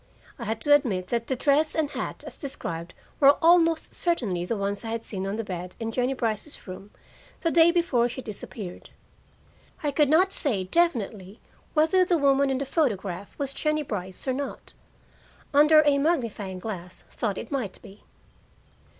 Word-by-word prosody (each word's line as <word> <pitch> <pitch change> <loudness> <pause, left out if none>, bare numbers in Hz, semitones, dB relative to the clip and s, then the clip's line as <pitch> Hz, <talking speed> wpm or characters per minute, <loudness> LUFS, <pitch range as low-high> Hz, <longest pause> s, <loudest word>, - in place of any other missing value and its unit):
I 235 - -5
had 220 +1 -2
to 290 - +4
admit 205 -11 +2
that 235 -1 -1
the 260 - 0
dress 295 +4 +2
and 305 -2 0
hat - - -4
as - - -3
described 170 - -6 0.2
were 280 0 +7
almost 330 -1 +4
certainly 225 - 0
the 225 +4 -2
ones 200 +1 -2
I 225 - -5
had 230 0 -4
seen 195 -2 -4
on 195 - -2
the 225 - -3
bed 180 -2 -6
in 225 -1 -3
Jennie 250 +3 0
Brice's 230 +4 -3
room 190 +2 -9 0.5
the 330 - +1
day 330 0 +6
before 330 -9 +2
she 245 - -7
disappeared. 210 -5 -8 0.9
I 295 - +1
could 290 0 +3
not 365 +5 +4
say 230 - 0
definitely 215 - 0 0.4
whether 320 +5 +4
the 355 -1 +2
woman 280 -1 +3
in 265 - 0
the 275 - -2
photograph 205 - -2
was 275 -2 -3
Jennie 305 +1 0
Brice 190 -4 -5
or 260 - +2
not; 280 +2 -5 0.8
under 305 +2 +7
a 285 -1 +4
magnifying 230 - -1
glass 185 -3 -7
thought 210 -5 -2
it - - -7
might 250 -9 -3
be. 200 -1 -14
250 Hz, 175 wpm, -26 LUFS, 200-300 Hz, 0.9 s, were